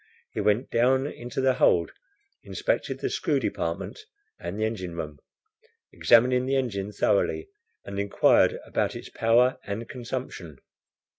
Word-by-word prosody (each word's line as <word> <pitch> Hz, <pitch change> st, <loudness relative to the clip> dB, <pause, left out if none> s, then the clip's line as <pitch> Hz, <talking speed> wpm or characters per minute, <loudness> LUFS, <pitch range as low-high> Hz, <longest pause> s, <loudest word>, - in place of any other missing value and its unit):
He -, -, -3 dB
went 105 Hz, +4 st, +1 dB
down 130 Hz, +3 st, +3 dB
into 125 Hz, -2 st, -5 dB
the 130 Hz, 0 st, +3 dB
hold, 85 Hz, -9 st, +3 dB, 0.5 s
inspected -, -, -2 dB
the -, -, 0 dB
screw -, -, +1 dB
department 85 Hz, -, -3 dB, 0.4 s
and 85 Hz, +4 st, -5 dB
the 110 Hz, -, +1 dB
engine 95 Hz, -6 st, -4 dB
room, 75 Hz, -3 st, -6 dB, 0.7 s
examining 125 Hz, +2 st, +4 dB
the 135 Hz, -, +1 dB
engine 105 Hz, -7 st, -1 dB
thoroughly, 100 Hz, -, +1 dB, 0.4 s
and 100 Hz, 0 st, -5 dB
inquired 100 Hz, 0 st, +4 dB
about -, -, -1 dB
its -, -, -8 dB
power 120 Hz, +3 st, +3 dB
and 105 Hz, +3 st, -5 dB
consumption. 120 Hz, -, -6 dB
115 Hz, 135 wpm, -26 LUFS, 100-125 Hz, 0.7 s, examining